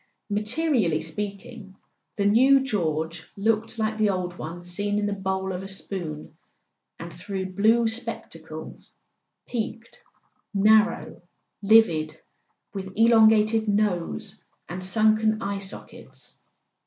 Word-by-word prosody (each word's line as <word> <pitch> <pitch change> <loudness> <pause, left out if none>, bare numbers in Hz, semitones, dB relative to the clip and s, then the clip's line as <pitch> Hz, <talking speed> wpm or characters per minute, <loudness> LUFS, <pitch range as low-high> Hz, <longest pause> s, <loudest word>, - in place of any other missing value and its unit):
Materially 215 - +1
speaking, 200 +5 -6 0.4
the 200 - -1
new 260 +6 +5
George 165 - -2
looked 220 +2 0
like 220 0 -1
the 215 -1 +3
old 180 -2 -2
one 175 +1 -7
seen 205 +4 -2
in 210 - 0
the 205 - -1
bowl 190 -1 -2
of 180 - -4
a 195 - -7
spoon, 180 -5 -6 0.6
and 170 +1 -9
through 190 +1 -5
blue 225 +4 +3
spectacles: 225 +2 -6 0.5
peaked, 230 0 -6 0.5
narrow, 215 +3 +3 0.4
livid, 170 -8 +3 0.5
with 190 -1 -6
elongated 220 -1 +4
nose 205 0 -1 0.3
and 180 +1 -5
sunken 215 +2 +2
eye 200 -2 -3
sockets. 195 0 -8
205 Hz, 110 wpm, -25 LUFS, 185-220 Hz, 0.6 s, new